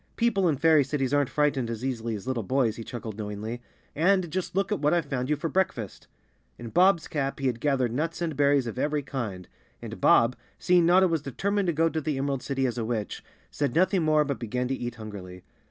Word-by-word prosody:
"People 215 -6 +2
in 145 - 0
fairy 160 0 +5
cities 135 -1 -2
aren't 145 -2 +2
frightened 145 -6 +1
as 115 +2 -4
easily 115 -3 -2
as 100 - -8
little 130 -2 -1
boys," 115 +1 +1
he 115 - -7
chuckled 110 -2 -7
knowingly. 105 +3 -5 0.3
"And 180 +1 +2
just 185 +1 -3
look 195 +1 0
what 150 -5 +2
I've 170 -3 0
found 130 -2 -3
you 150 - +3
for 150 +3 -3
breakfast!" 155 - -2 0.5
In 120 -1 -7
Bob's 180 - +3
cap 140 -2 -2
he 135 - -3
had 120 -3 0
gathered 130 -4 +1
nuts 160 +6 -2
and 165 -3 -2
berries 140 -1 +3
of 115 +2 -5
every 150 +1 0
kind, 110 -10 -5 0.3
and - - -8
Bob, 115 +2 +5 0.2
seeing 180 -2 +3
Notta 185 +2 +5
was 165 -3 0
determined 195 - -1
to - - +3
go 165 +2 +2
to 160 -1 -2
the 150 -2 -2
Emerald 135 -1 -1
City 135 0 -1
as 125 -1 -2
a - - -1
witch, 110 -3 -3 0.3
said 145 -4 -2
nothing 185 +2 +3
more 155 -1 +3
but 140 -2 -3
began 125 +2 -2
to 135 - 0
eat 120 -2 -5
hungrily. 100 -5 -9
140 Hz, 220 wpm, -27 LUFS, 120-165 Hz, 0.5 s, fairy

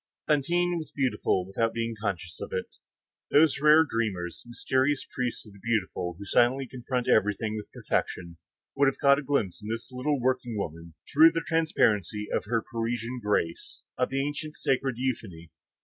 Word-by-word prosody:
Fantine 175 +4 +2
was 155 - -7
beautiful, 125 -8 0
without 115 +4 -1
being 115 0 -1
too 110 - -9
conscious 90 -5 -4
of - - -6
it. - - -4 0.5
Those 145 -2 +4
rare 155 +2 +7
dreamers, 95 - -2
mysterious 130 +3 0
priests 125 -3 -3
of 105 - -14
the 100 - -15
beautiful 95 -5 -1
who 100 - -8
silently 125 +6 +3
confront 125 0 -3
everything 105 +1 +2
with 105 -1 -7
perfection, 85 -2 -3 0.4
would 140 0 +4
have 135 - +1
caught 140 0 +5
a - - -3
glimpse 120 -12 -1
in 105 - -7
this 115 +3 -4
little 130 +3 -1
working 125 -2 0
woman, 85 -3 -6 0.2
through 160 +3 +7
the 165 - -1
transparency 110 - +1
of - - 0
her 115 +1 0
Parisian 115 +1 -3
grace, 95 -5 -1
of 125 - 0
the 135 +1 0
ancient 150 +1 -5
sacred 135 -1 0
euphony. 100 -11 -4
120 Hz, 170 wpm, -28 LUFS, 105-140 Hz, 0.5 s, rare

